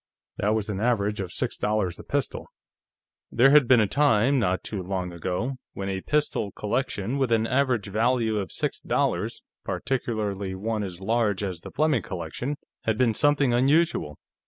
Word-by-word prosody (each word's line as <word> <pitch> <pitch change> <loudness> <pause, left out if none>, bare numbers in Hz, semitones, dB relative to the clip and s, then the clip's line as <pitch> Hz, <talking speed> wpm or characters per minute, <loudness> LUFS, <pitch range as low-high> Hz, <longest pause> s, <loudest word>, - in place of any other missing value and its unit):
That 105 +2 +1
was 110 -2 -1
an 100 -3 -3
average 105 -3 +1
of 95 -3 -4
six - - -2
dollars 105 -5 -1
a - - -8
pistol. - - -2 0.8
There 130 +4 +5
had 145 -4 +6
been 125 -1 +6
a 110 - +4
time, 135 +1 +3
not 95 -4 0
too 100 -3 -4
long 90 -1 -3
ago, 90 +10 -3 0.2
when 95 0 -4
a 95 -1 -2
pistol 150 -8 0
collection 120 +1 -2
with 130 -3 +1
an 115 -1 +3
average 125 -3 +1
value 110 +1 +1
of 95 - -4
six - - -2
dollars, - - -1 0.2
particularly 105 -7 -2
one 110 +3 -2
as 95 -3 -5
large 105 -1 +1
as 95 -4 -3
the - - -9
Fleming 150 -5 +1
collection, 95 - -4 0.3
had 110 -1 +1
been 120 -2 +3
something 145 0 +3
unusual. 135 - +2
110 Hz, 170 wpm, -26 LUFS, 100-130 Hz, 0.8 s, had